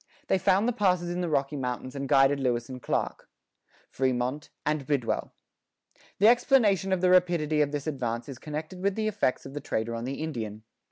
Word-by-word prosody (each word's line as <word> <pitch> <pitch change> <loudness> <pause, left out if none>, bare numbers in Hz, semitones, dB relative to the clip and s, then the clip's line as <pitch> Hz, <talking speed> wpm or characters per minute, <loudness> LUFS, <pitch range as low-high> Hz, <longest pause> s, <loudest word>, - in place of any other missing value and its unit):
They 190 - +3
found 195 +5 +3
the 245 - +1
passes 180 -6 +1
in 175 +1 -2
the 175 - -1
Rocky 140 -1 0
Mountains 130 -1 -4
and 140 -1 -4
guided 135 +1 +5
Lewis 120 -3 -1
and 130 -1 -7
Clark,[13:1] - - -2 0.9
Frémont, 130 +5 -3 0.2
and 150 -2 -1
Bidwell. 140 -6 -1 0.9
The 205 - +5
explanation 225 - +4
of 190 -2 +1
the 180 0 +4
rapidity 170 -4 +3
of 145 -1 +1
this 145 -1 -3
advance 120 -5 -3
is 135 -3 -8
connected 155 +4 -6
with 200 0 +1
the 220 -1 -1
effects 205 -11 0
of 135 - -9
the 145 - -5
trader 110 +1 -2
on 115 +1 -4
the 135 +2 -3
Indian. 110 -8 -5
150 Hz, 190 wpm, -28 LUFS, 130-185 Hz, 0.9 s, guided